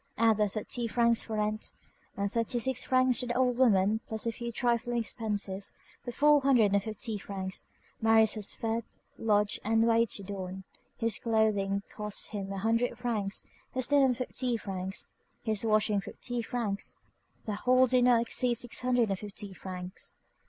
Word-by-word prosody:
Add 225 -1 +4
the 210 -1 +3
thirty 225 +3 -3
francs 235 0 +3
for 220 - -5
rent, 215 +1 -1 0.4
and 200 - 0
the - - 0
thirty 230 +1 0
six 255 +1 +1
francs 255 -2 +3
to 250 - -1
the 240 - -2
old 250 -1 +2
woman, 215 -3 +4
plus 220 0 -2
a 230 - +1
few 235 +1 -5
trifling 240 +1 0
expenses; 210 -4 -2 0.3
for 245 - -5
four 295 +3 +4
hundred 245 -7 +4
and 200 - +3
fifty 220 0 -4
francs, 190 -1 -4 0.4
Marius 220 -1 +4
was 210 -2 -1
fed, 225 0 -2 0.4
lodged, 210 -2 +2
and 225 +1 +3
waited 225 -4 +1
on. 190 -1 -6 0.3
His 230 -2 0
clothing 205 -3 +1
cost 210 -1 -2
him 200 -2 -4
a 195 - -4
hundred 230 +4 0
francs, 210 -5 -1 0.3
his 255 +1 -2
linen 270 -3 +4
fifty 250 -1 -2
francs, 190 -2 -4 0.4
his 220 -2 0
washing 215 -2 +2
fifty 240 +4 -4
francs; 225 -4 -2 0.5
the 215 - -2
whole 255 +5 +4
did 250 0 +3
not 240 -2 +5
exceed 240 +1 +3
six 240 0 0
hundred 250 -3 +2
and 195 -1 -1
fifty 205 -1 -6
francs. 185 0 -6
225 Hz, 170 wpm, -30 LUFS, 205-240 Hz, 0.5 s, not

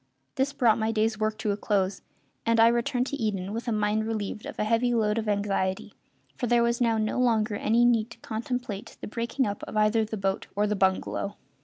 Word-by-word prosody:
This 270 +1 0
brought 240 -6 +3
my 220 0 +1
day's 220 0 0
work 215 0 0
to 215 -1 -1
a - - 0
close, 195 -2 0 0.4
and 230 0 +2
I 225 +1 +7
returned 245 +2 0
to 285 - -3
Eden 205 -5 -2
with 230 +2 -4
a - - +1
mind 215 0 0
relieved 215 -1 -4
of - - -8
a - - 0
heavy 230 +3 +2
load 215 -1 +1
of 220 -1 -3
anxiety, 200 -2 -1 0.4
for 245 - -2
there 240 0 +4
was 235 +1 0
now 230 -2 +3
no 215 +2 0
longer 225 -3 +2
any 225 +3 +2
need 230 -2 +3
to 235 - -12
contemplate 230 -2 -5
the - - -6
breaking 235 +4 -1
up 205 0 -3
of - - -5
either 215 +1 +3
the 220 0 -4
boat 195 0 -1
or 205 +1 +2
the 210 0 0
bungalow. 195 +1 0
220 Hz, 220 wpm, -27 LUFS, 210-235 Hz, 0.4 s, I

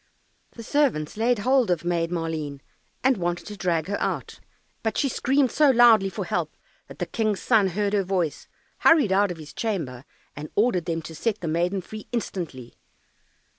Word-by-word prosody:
The 230 - -9
servants 240 - 0
laid 235 +3 +2
hold 255 +2 +2
of 175 -2 0
Maid 170 -1 0
Maleen 160 -5 -3 0.4
and 260 0 +3
wanted 175 -1 -2
to 210 - -7
drag 170 -5 0
her 205 +1 -3
out, - - -3 0.4
but 220 -2 -2
she 285 - +2
screamed 265 +1 +1
so 300 -2 +4
loudly 235 -6 +6
for - - -5
help, - - -2 0.3
that - - -12
the - - -2
King's 215 -3 -1
son 220 -5 +3
heard 200 +3 -1
her 205 - +3
voice, 180 -5 -2 0.3
hurried 295 -11 +5
out 200 +1 +3
of 175 - -5
his 155 -2 -11
chamber 155 - -3 0.3
and 150 +1 -7
ordered 205 -6 +2
them 165 -2 -2
to 160 - -8
set 220 +6 -2
the 170 - -3
maiden 175 +4 0
free 215 +4 -10
instantly. 170 - -5
195 Hz, 180 wpm, -25 LUFS, 165-230 Hz, 0.4 s, loudly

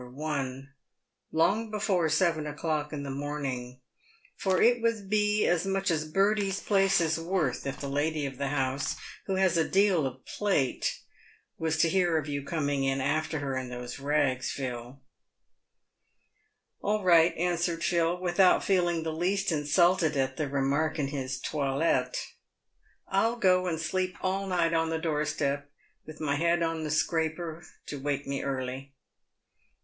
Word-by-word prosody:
1, 135 -2 -4 0.3
" - - -55 0.3
long 210 +8 +2
before 195 -6 +1
seven 160 -1 +1
o'clock 150 0 -2
in 145 -2 -4
the 140 - -4
morning, 135 -3 -4 0.5
for 190 -2 +1
it 240 0 +4
would 220 -4 -1
be 210 0 +2
as 175 -1 +2
much 195 -1 0
as 155 -1 -1
Bertie's 200 +1 +2
place 195 -2 +3
is 165 -1 +1
worth 165 -7 -1
if 135 - -4
the 140 - -4
lady 145 +2 -1
of 135 -1 -6
the 140 - -1
house, 135 -1 -1 0.3
who 190 - 0
has 190 -3 +3
a 160 - +1
deal 190 -7 +3
of 130 0 -9
plate, 190 -11 0 0.6
was 160 -1 0
to 165 - +4
hear 175 -1 +2
of 155 -1 -2
you 140 -1 -2
coming 140 -3 0
after 155 +4 0
her 135 -2 -2
in 130 -1 -3
those 125 +1 -6
rags, 140 -2 +1
Phil." 125 -1 -5 0.9
" - - -47
All 210 0 0
right," 170 -2 +5
answered 170 0 0
Phil, 170 0 +1
without 180 +1 +4
feeling 175 -4 +1
the 160 -1 -3
least 185 +4 0
insulted 160 +1 +2
at 130 0 0
the 150 -3 -2
remark 140 +4 0
in 140 -3 -1
his 135 -2 -4
toilette; 135 -2 0 0.4
" - - -49 0.3
I'll 225 +5 +2
go 185 -5 +3
and 165 -3 -1
sleep 185 +3 -2
all 195 +1 -1
night 170 -3 +1
on 165 0 +1
the 165 - 0
door 155 -2 -1
step, 145 -1 -2 0.4
with 155 0 -10
my 145 -2 0
head 170 +2 +2
on 165 -1 -1
the 155 - -3
scraper 160 +2 -1 0.2
to 145 - -6
wake 145 0 -2
me 140 0 -3
early." 135 0 -4
160 Hz, 165 wpm, -29 LUFS, 140-180 Hz, 0.9 s, right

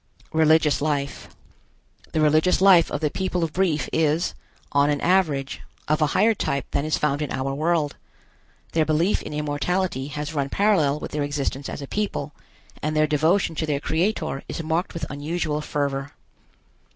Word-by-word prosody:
RELIGIOUS 160 -2 +4
LIFE. 145 -2 -2 0.8
The 155 - 0
religious 155 +4 +3
life 190 -3 +6
of 145 - -3
the 150 -2 0
people 185 -2 -1
of 160 -2 -2
Brief 175 -5 +1
is, 160 +2 +1 0.4
on 140 +1 +3
an 145 -1 +1
average, 155 -7 +1 0.3
of 155 +1 +1
a 150 - +4
higher 225 +1 +5
type 140 -9 -2
than 140 - 0
is 155 - +1
found 145 0 0
in 150 - -3
our 135 +1 -2
world. 155 0 0 0.7
Their 160 - +2
belief 160 +6 +1
in - - -7
immortality 150 0 -1
has 150 +2 -5
run 140 -2 -1
parallel 160 -7 +2
with - - -6
their 150 - -2
existence 145 -1 -2
as 140 - -6
a - - -7
people, 175 -8 -3 0.5
and 155 +1 -1
their 155 0 +4
devotion 160 +4 +2
to 160 - -1
their 145 -2 0
Creator 160 -2 -1
is 165 - -4
marked 165 +3 -1
with 165 -2 -3
unusual 150 +1 -2
fervor. 140 -1 -2
155 Hz, 170 wpm, -24 LUFS, 145-165 Hz, 0.8 s, life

